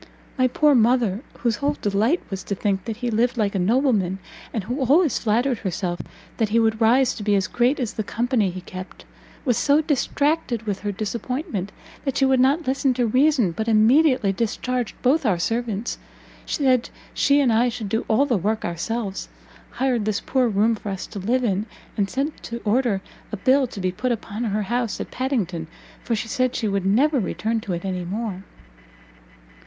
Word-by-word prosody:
My 255 Hz, -1 st, +3 dB
poor 295 Hz, +4 st, +3 dB
mother, 235 Hz, -4 st, +3 dB, 0.2 s
whose 235 Hz, -3 st, +1 dB
whole 290 Hz, +4 st, -1 dB
delight 215 Hz, -, +1 dB
was 195 Hz, -1 st, -4 dB
to 200 Hz, -, -2 dB
think 195 Hz, -1 st, -1 dB
that 225 Hz, -2 st, -4 dB
he 240 Hz, -, 0 dB
lived 235 Hz, +3 st, +1 dB
like 210 Hz, -3 st, +1 dB
a 195 Hz, -, 0 dB
nobleman, 205 Hz, -3 st, +2 dB, 0.3 s
and 220 Hz, -, -2 dB
who 245 Hz, +8 st, -3 dB
always 290 Hz, +3 st, +3 dB
flattered 235 Hz, +2 st, +1 dB
herself 175 Hz, -1 st, -3 dB, 0.4 s
that 220 Hz, -2 st, +1 dB
he 230 Hz, +2 st, +3 dB
would 220 Hz, 0 st, +1 dB
rise 245 Hz, +3 st, +4 dB
to -, -, -8 dB
be 205 Hz, 0 st, +2 dB
as 195 Hz, -1 st, +2 dB
great 245 Hz, +10 st, +1 dB
as 240 Hz, -5 st, -2 dB
the 215 Hz, -, -2 dB
company 230 Hz, -1 st, 0 dB
he 185 Hz, +1 st, -6 dB
kept, 185 Hz, +1 st, -9 dB, 0.4 s
was 245 Hz, -3 st, +2 dB
so 285 Hz, +3 st, +4 dB
distracted 290 Hz, -4 st, 0 dB
with 205 Hz, -3 st, -3 dB
her 205 Hz, -, -2 dB
disappointment, 215 Hz, -, -3 dB, 0.3 s
that 270 Hz, -2 st, -2 dB
she 270 Hz, -, +4 dB
would 265 Hz, -1 st, +3 dB
not 280 Hz, +6 st, +3 dB
listen 265 Hz, 0 st, +1 dB
to 245 Hz, -1 st, +1 dB
reason, 255 Hz, -, +3 dB
but 220 Hz, +7 st, -4 dB
immediately 230 Hz, 0 st, +4 dB
discharged 240 Hz, +3 st, -2 dB
both 280 Hz, +5 st, +3 dB
our 205 Hz, -8 st, +2 dB
servants, 225 Hz, +3 st, -2 dB, 0.5 s
said 255 Hz, -4 st, +2 dB, 0.2 s
she 285 Hz, 0 st, +3 dB
and 255 Hz, -5 st, +3 dB
I 240 Hz, +3 st, +3 dB
should 230 Hz, -3 st, -5 dB
do 225 Hz, +3 st, 0 dB
all 225 Hz, +6 st, +3 dB
the 250 Hz, -6 st, +1 dB
work 215 Hz, +4 st, -1 dB
ourselves, 195 Hz, +4 st, -3 dB, 0.4 s
hired 250 Hz, -5 st, 0 dB
this 215 Hz, -1 st, 0 dB
poor 260 Hz, -2 st, +1 dB
room 220 Hz, +1 st, +2 dB
for 210 Hz, -1 st, -5 dB
us 195 Hz, -2 st, -4 dB
to 205 Hz, -, -8 dB
live 245 Hz, +7 st, 0 dB
in, 205 Hz, -1 st, 0 dB, 0.3 s
and 200 Hz, -3 st, 0 dB
sent 280 Hz, +6 st, -3 dB
to 235 Hz, 0 st, -5 dB
order 215 Hz, -3 st, +1 dB, 0.3 s
a 215 Hz, -, -3 dB
bill 260 Hz, +6 st, +3 dB
to 210 Hz, -, -9 dB
be 185 Hz, -1 st, 0 dB
put 250 Hz, +7 st, -2 dB
upon 225 Hz, 0 st, -3 dB
her 210 Hz, -1 st, 0 dB
house 235 Hz, +2 st, -2 dB
at -, -, -6 dB
Padington, 200 Hz, -, -2 dB, 0.4 s
for 235 Hz, -, 0 dB
she 220 Hz, +1 st, -3 dB
said 255 Hz, +2 st, 0 dB
she 225 Hz, -, -1 dB
would 195 Hz, -1 st, 0 dB
never 270 Hz, +8 st, +3 dB
return 220 Hz, +2 st, -1 dB
to 195 Hz, -, -4 dB
it 170 Hz, +2 st, -4 dB
any 185 Hz, -2 st, -2 dB
more." 195 Hz, +1 st, -4 dB
230 Hz, 195 wpm, -23 LUFS, 200-255 Hz, 0.5 s, rise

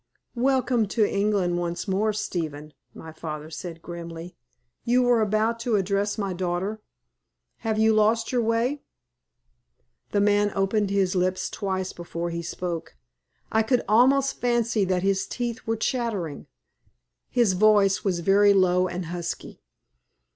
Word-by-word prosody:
"Welcome 255 Hz, -4 st, +2 dB
to 215 Hz, -2 st, +4 dB
England 200 Hz, -4 st, 0 dB
once 170 Hz, +2 st, -3 dB
more, 200 Hz, +3 st, +1 dB
Stephen," 160 Hz, -8 st, -4 dB, 0.2 s
my 160 Hz, -, -10 dB
father 155 Hz, -1 st, -7 dB
said, 165 Hz, 0 st, -7 dB
grimly. 170 Hz, 0 st, -8 dB, 0.5 s
"You 250 Hz, +1 st, +3 dB
were 245 Hz, -2 st, +3 dB
about 215 Hz, +2 st, +1 dB
to 230 Hz, -1 st, 0 dB
address 200 Hz, +1 st, 0 dB
my 200 Hz, -3 st, -2 dB
daughter. 185 Hz, +4 st, -2 dB, 0.8 s
Have 220 Hz, -2 st, -2 dB
you 220 Hz, 0 st, +4 dB
lost 220 Hz, +1 st, +2 dB
your 250 Hz, -2 st, +1 dB
way?" 230 Hz, +5 st, 0 dB, 1.3 s
The 205 Hz, -, +1 dB
man 205 Hz, 0 st, +3 dB
opened 195 Hz, +1 st, +1 dB
his 195 Hz, -2 st, +1 dB
lips 185 Hz, 0 st, 0 dB
twice 190 Hz, -2 st, -3 dB
before 170 Hz, 0 st, -5 dB
he 170 Hz, 0 st, -3 dB
spoke. 170 Hz, -, -5 dB, 0.6 s
I 220 Hz, -, +3 dB
could 235 Hz, +2 st, +1 dB
almost 265 Hz, +5 st, +3 dB
fancy 235 Hz, -4 st, +1 dB
that 185 Hz, -1 st, 0 dB
his 195 Hz, 0 st, +1 dB
teeth 240 Hz, -1 st, -4 dB
were 225 Hz, 0 st, 0 dB
chattering. 220 Hz, -, -2 dB, 0.8 s
His 235 Hz, -6 st, +2 dB
voice 200 Hz, 0 st, +4 dB
was 180 Hz, -4 st, 0 dB
very 200 Hz, +3 st, +5 dB
low 185 Hz, -1 st, +3 dB
and 180 Hz, 0 st, -4 dB
husky. 170 Hz, 0 st, -6 dB
200 Hz, 140 wpm, -25 LUFS, 180-225 Hz, 1.3 s, very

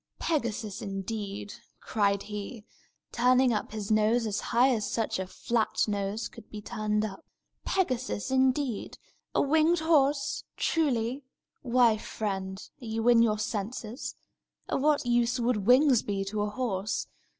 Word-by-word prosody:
"Pegasus, 235 Hz, -, -2 dB
indeed!" 200 Hz, 0 st, -5 dB, 0.3 s
cried 200 Hz, -2 st, 0 dB
he, 210 Hz, +1 st, -7 dB, 0.5 s
turning 250 Hz, +1 st, +4 dB
up 210 Hz, -, -2 dB
his 215 Hz, -1 st, -4 dB
nose 215 Hz, +2 st, +3 dB
as 210 Hz, -2 st, -1 dB
high 245 Hz, +3 st, +3 dB
as 215 Hz, -3 st, -1 dB
such 225 Hz, -4 st, -1 dB
a 190 Hz, -, -3 dB
flat 225 Hz, +4 st, 0 dB
nose 205 Hz, +1 st, -2 dB
could 230 Hz, -3 st, -14 dB
be 210 Hz, -, -7 dB
turned 215 Hz, -1 st, -1 dB
up 215 Hz, +10 st, -7 dB, 0.4 s
"Pegasus, 260 Hz, -, -1 dB
indeed! 260 Hz, -3 st, +1 dB, 0.4 s
A -, -, +4 dB
winged 315 Hz, +4 st, +3 dB
horse, 295 Hz, -4 st, +2 dB
truly! 265 Hz, -5 st, 0 dB, 0.4 s
Why, 240 Hz, -3 st, +3 dB
friend, 190 Hz, -3 st, -4 dB, 0.2 s
are -, -, -8 dB
you 225 Hz, +1 st, -2 dB
in 235 Hz, -1 st, +6 dB
your 215 Hz, -2 st, +3 dB
senses? 215 Hz, +3 st, -4 dB, 0.5 s
Of -, -, -1 dB
what 295 Hz, -2 st, +2 dB
use 240 Hz, +1 st, +2 dB
would 230 Hz, -4 st, 0 dB
wings 255 Hz, -1 st, +6 dB
be 195 Hz, -1 st, -2 dB
to 205 Hz, +1 st, -2 dB
a 210 Hz, -, 0 dB
horse? 210 Hz, -4 st, -2 dB
225 Hz, 140 wpm, -29 LUFS, 210-255 Hz, 0.5 s, in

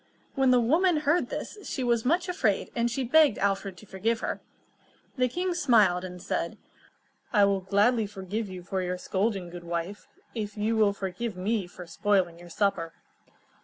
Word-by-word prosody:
When 270 Hz, -1 st, +3 dB
the 250 Hz, -1 st, +6 dB
woman 315 Hz, +7 st, +3 dB
heard 305 Hz, +4 st, +2 dB
this, 425 Hz, -, -5 dB
she 265 Hz, -, -3 dB
was 235 Hz, -2 st, +1 dB
much 345 Hz, +7 st, +2 dB
afraid, 225 Hz, -, 0 dB
and 235 Hz, 0 st, +1 dB
she 260 Hz, +3 st, -2 dB
begged 290 Hz, -1 st, +5 dB
Alfred 195 Hz, -1 st, -1 dB
to 215 Hz, -, -13 dB
forgive 220 Hz, +4 st, -1 dB
her. -, -, -3 dB, 0.7 s
The 255 Hz, -2 st, +2 dB
king 360 Hz, +7 st, -1 dB
smiled, 215 Hz, -, +4 dB
and 180 Hz, -1 st, -7 dB
said: -, -, -3 dB, 0.7 s
"I 205 Hz, -4 st, +5 dB
will 200 Hz, -1 st, +2 dB
gladly 205 Hz, +4 st, +2 dB
forgive 200 Hz, +2 st, -4 dB
you 185 Hz, -1 st, -8 dB
for 190 Hz, +1 st, -2 dB
your 180 Hz, 0 st, -2 dB
scolding, 190 Hz, -1 st, -1 dB
good 175 Hz, 0 st, -8 dB
wife, 170 Hz, +4 st, -4 dB, 0.3 s
if 210 Hz, -2 st, -4 dB
you 215 Hz, +2 st, +1 dB
will 210 Hz, -2 st, +4 dB
forgive 195 Hz, +2 st, -4 dB
me 200 Hz, 0 st, -1 dB
for 180 Hz, 0 st, -10 dB
spoiling 175 Hz, -1 st, 0 dB
your 175 Hz, 0 st, -12 dB
supper." 165 Hz, -3 st, 0 dB
205 Hz, 175 wpm, -28 LUFS, 185-240 Hz, 0.7 s, the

